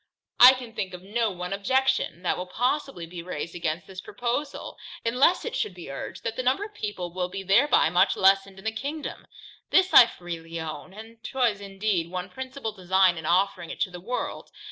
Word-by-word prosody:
I 250 +2 +11
can 250 -3 -8
think 185 -4 -4
of 180 - -12
no 225 +3 0
one 180 0 -5
objection, 260 -3 0
that 180 - +1
will 180 - -5
possibly 250 - -1
be 170 +1 -8
raised 170 -1 -5
against 170 -1 -3
this 185 +1 -9
proposal, 245 +8 -4 0.3
unless 255 +10 +3
it 475 +1 -4
should 190 - -2
be 170 -6 -9
urged, 135 - -7
that 230 -1 -3
the 255 - -2
number 255 +10 +1
of 420 - -12
people 185 - -5
will 180 0 -2
be 195 +1 -6
thereby 200 - +4
much 175 - +3
lessened 195 0 +3
in 190 - -13
the 220 - +1
kingdom. 285 +7 -6 0.4
This 370 0 +3
I 240 - +10
freely 165 -3 -7
own, 160 +3 -6
and 225 +3 -12 0.2
was 235 -6 +1
indeed 195 -3 -1
one 180 0 -5
principal 260 -3 -5
design 190 -2 +3
in 160 -1 -6
offering 180 -1 +1
it - - -7
to 185 - +1
the 180 -1 -9
world. 245 +7 -4
195 Hz, 200 wpm, -26 LUFS, 180-245 Hz, 0.4 s, I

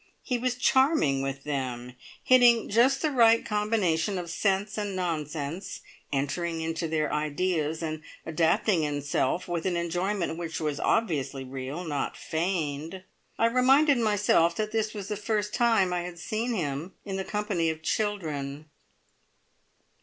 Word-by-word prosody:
he 250 -2 -1
was 250 0 0
charming 255 - +3
with 135 0 -4
them, 125 -4 -4 0.3
hitting 240 -3 +5
just 255 +5 +3
the 310 - +2
right 230 -3 +5
combination 210 -4 0
of 175 -2 -5
sense 200 +2 0
and 205 -2 -3
nonsense, 160 -1 -3 0.3
entering 165 +5 -1
into 165 +1 -2
their 155 -2 -1
ideas, 155 +1 -1
and 155 -1 -3 0.2
adapting 165 +3 +2
himself 145 +2 -1
with 175 -2 -2
an 180 -2 0
enjoyment 175 0 -1
which 165 -1 -4
was 150 -3 -2
obviously 145 - 0
real, 135 +5 -5
not 145 -5 -3
feigned. 165 0 -3 0.3
I 230 - +3
reminded 260 +4 +4
myself 205 -6 +3
that 215 +2 -2
this 220 -1 -1
was 200 -2 -5
the 210 - -2
first 210 0 -2
time 225 -7 +3
I 175 - 0
had 175 0 -7
seen 225 +7 -2
him 155 -1 -3
in 195 -2 -3
the 190 - -2
company 205 -5 -1
of 160 0 -5
children. 155 -8 -2
175 Hz, 145 wpm, -27 LUFS, 155-210 Hz, 0.3 s, hitting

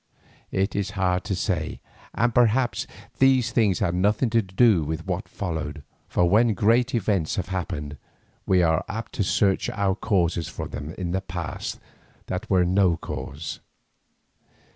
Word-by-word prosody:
It 95 +2 0
is 100 -1 -1
hard 90 -1 +1
to 100 -2 -1
say, - - -2 0.4
and 120 0 +2
perhaps 120 +1 +2 0.3
these 130 -2 +4
things 105 -6 +2
had 95 -5 0
nothing 105 +6 +2
to 115 0 +4
do 95 -1 +3
with 80 +3 -4
what 95 +2 -3
followed, 80 -5 -4 0.2
for 90 - +2
when 110 +4 +4
great 120 +6 +3
events 100 -7 0
have 95 -2 -3
happened, 75 -6 -4 0.5
we 90 -2 +4
are 80 -1 +2
apt 115 +2 -5
to 105 - 0
search 95 0 +2
out 100 -1 -1
causes 85 -5 +1
for - - -6
them 75 +3 -7
in 90 -2 -3
the 95 +1 0
past 90 -3 -5 0.5
that 95 +5 -4
were 90 -2 +4
no 90 -2 +3
cause. 70 +3 -6
95 Hz, 155 wpm, -25 LUFS, 85-110 Hz, 0.5 s, these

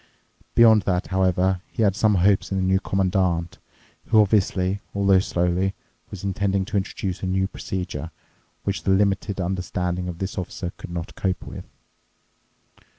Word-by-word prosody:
Beyond 110 -2 +7
that, 90 0 +1
however, 95 0 +2
he 115 - 0
had 100 -2 +3
some 105 0 +3
hopes 95 +2 +3
in 95 - 0
the 95 - 0
New 95 +1 +3
Commandant, 90 -3 0 0.5
who 110 - +5
obviously, 100 -2 +2 0.2
although 100 -1 +4
slowly, 90 +1 0 0.3
was 100 -2 -8
intending 100 0 0
to 105 - -6
introduce 95 -1 -3
a 95 - -2
new 95 +1 +1
procedure 90 -4 -5 0.5
which 100 0 -2
the - - -2
limited 100 0 +1
understanding 90 0 -2
of 90 -2 -5
this 95 +1 -3
Officer 90 0 -5
could - - -9
not 85 -1 -5
cope 95 -2 -2
with. - - -8
95 Hz, 150 wpm, -24 LUFS, 90-100 Hz, 0.5 s, Beyond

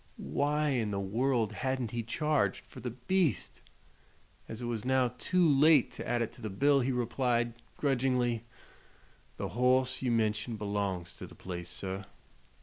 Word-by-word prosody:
Why 150 +1 +2
in 120 -6 0
the 100 -1 -2
world 115 +2 0
hadn't 130 0 -2
he 120 - -2
charged 150 +6 0
for - - -12
"the 125 - -4
beast"? 150 +7 0 0.9
As 110 - -6
it - - -2
was 115 -3 -2
now 130 -1 +2
too 180 +3 +3
late 145 -1 +5
to - - -7
add 120 -1 +1
it 115 - -4
to 120 - -15
the 110 - -3
bill 140 +8 +3
he 130 +1 +1
replied, 120 -1 0 0.2
grudgingly: 125 -4 +1 0.9
"The - - -3
hoss 130 +2 +2
you 130 - 0
mention 110 0 0
belongs 100 -4 -2
to - - -8
the - - -14
place, 85 -2 -6
sir. 95 +1 -4
120 Hz, 160 wpm, -31 LUFS, 110-135 Hz, 0.9 s, late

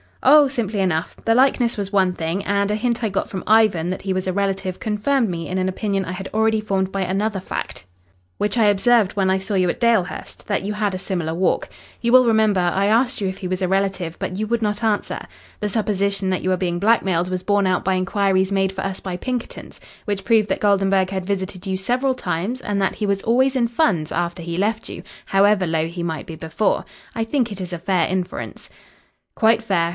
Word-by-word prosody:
"Oh, 290 +2 +7
simply 225 -6 -2
enough. 175 -4 0
The 225 - +4
likeness 250 -2 +3
was 200 0 -4
one 190 -2 +3
thing, 170 +3 -3
and 200 0 +1
a 210 - +1
hint 235 +2 -1
I 220 - +1
got 195 - -2
from 190 - -5
Ivan 210 -6 +4
that 185 - -5
he 190 -1 -1
was 185 0 -2
a 185 - 0
relative 195 -1 -2
confirmed 225 +3 0
me 165 -2 -4
in 185 - -3
an 185 0 0
opinion 195 0 -2
I - - -5
had 190 +1 -6
already 220 0 +2
formed 195 -3 -1
by 195 - -2
another 195 +2 -1
fact 185 - -6 0.5
which 210 - 0
I 225 - +4
observed 205 0 +3
when 195 -2 +1
I 190 - +2
saw 195 +2 -3
you 185 -1 +2
at - - -3
Dalehurst 230 -6 0
that 205 -2 -1
you 205 +2 -2
had 210 -2 -1
a - - -4
similar 175 -4 -3
walk. 180 +3 0 0.3
You 235 - +1
will 255 0 +7
remember, 220 -4 +3
I 180 +2 +1
asked 240 +4 +2
you 200 - -1
if 190 0 -5
he 185 - -4
was 185 +1 -2
a - - +2
relative, 190 -3 -1
but 185 - -4
you 215 - -1
would 235 +1 -1
not 210 +1 -1
answer. 215 -2 0 0.4
The 210 - -1
supposition 200 -2 0
that 185 - -1
you 185 - 0
were 185 - +2
being 175 -1 -1
blackmailed 190 -4 +2
was 185 0 -3
borne 205 -1 +2
out 180 -1 +1
by 190 0 +1
inquiries 190 0 +1
made 195 -1 +1
for 190 0 -5
us 195 -1 -3
by 185 -2 -5
Pinkerton's, 250 +4 -5 0.3
which 205 -2 -2
proved 220 -2 +3
that 190 - 0
Goldenburg 195 -2 +2
had 190 -1 -3
visited 190 -1 -3
you 190 -1 -1
several 250 +7 0
times 225 +2 -3
and 205 -1 -2
that 195 - 0
he 210 - -2
was 200 -1 0
always 260 +4 +2
in 240 -2 +2
funds 220 - 0
after 175 +1 -2
he 170 0 -4
left 215 +3 -1
you, - - -7 0.3
however 195 0 +3
low 160 -1 0
he 170 +1 -6
might 160 -4 -3
be 165 - -7
before. 160 +6 -1 0.3
I 225 - 0
think 240 0 0
it 195 -1 -6
is 180 -1 -6
a 175 - -4
fair 180 -2 +1
inference." 185 -1 -4 0.6
"Quite 225 0 +3
fair." 175 -6 +1
195 Hz, 230 wpm, -21 LUFS, 185-220 Hz, 0.6 s, Oh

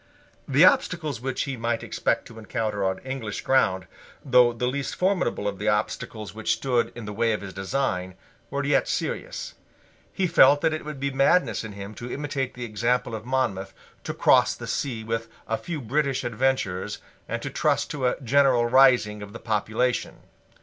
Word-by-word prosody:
The - - +6
obstacles 155 -9 +2
which 130 0 -2
he 140 -2 -4
might 115 -1 -2
expect - - -1
to 115 - -11
encounter 105 -2 -2
on 95 0 0
English 130 -6 -4
ground, 95 -9 +2 0.4
though 125 -2 +5
the 120 +1 -3
least 140 +2 -2
formidable 180 - 0
of 100 -2 -3
the 105 - -3
obstacles 105 0 -2
which 110 +1 0
stood 125 -3 0
in 120 -2 -7
the 105 - -5
way 115 +1 +1
of 105 - -3
his 95 -2 -8
design, 95 -3 -2 0.3
were 140 0 -2
yet 135 -2 +2
serious. - - -3 0.6
He 190 - 0
felt 145 -4 +6
that 160 - +2
it 155 - -4
would 150 -2 -6
be 140 +1 -1
madness 135 - +2
in 110 -2 -7
him 100 +1 -8
to 120 +2 -7
imitate 135 -3 -3
the 125 -1 -5
example 120 +2 0
of 110 +1 -6
Monmouth, 100 -8 -1 0.3
to - - -4
cross - - +4
the - - -8
sea 120 -6 -3
with 115 +1 -3 0.2
a 115 - 0
few 165 +5 -5
British 140 +2 0
adventurers, 120 -6 -1 0.3
and - - -2
to - - -4
trust - - +1
to 135 -4 0
a 125 - -1
general 130 -1 +4
rising 120 -4 +4
of 100 0 -9
the 115 - -8
population. 110 +3 -1
120 Hz, 185 wpm, -25 LUFS, 105-135 Hz, 0.6 s, The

